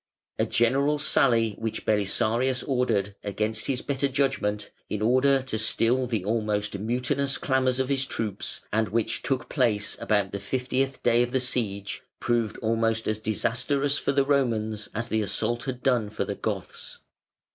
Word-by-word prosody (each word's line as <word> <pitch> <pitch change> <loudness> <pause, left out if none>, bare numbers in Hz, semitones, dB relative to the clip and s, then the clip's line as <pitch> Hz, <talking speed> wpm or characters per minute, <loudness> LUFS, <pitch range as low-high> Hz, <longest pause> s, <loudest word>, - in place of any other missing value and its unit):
A - - +2
general 135 +5 +2
sally 120 -6 +3
which 115 -1 -4
Belisarius 115 +5 +1
ordered, 115 -7 0
against 105 +2 -2
his 130 -2 -1
better 140 0 0
judgment, 130 -7 -1 0.2
in 105 - -2
order 130 +4 +3
to 120 -4 -3
still 120 +3 +2
the 110 -6 -2
almost 105 -2 -1
mutinous 125 +5 0
clamours 130 -4 +1
of 130 - +1
his 135 -1 0
troops, 105 -3 -3
and 110 -1 +1
which 115 +2 0
took 135 -2 -1
place 110 -7 +1
about 105 -3 +1
the 100 - -4
fiftieth 130 +5 -2
day 120 0 +4
of 120 0 0
the 130 - +2
siege, 105 -6 -2 0.2
proved 120 -3 0
almost 115 0 +1
as 110 0 0
disastrous 130 +6 0
for - - 0
the 140 0 +2
Romans 110 -7 0
as 115 +2 -2
the 110 -1 0
assault 120 +3 0
had 130 -2 -5
done 120 -6 +2
for 105 - -3
the - - -3
Goths. - - -5
120 Hz, 160 wpm, -26 LUFS, 110-130 Hz, 0.2 s, day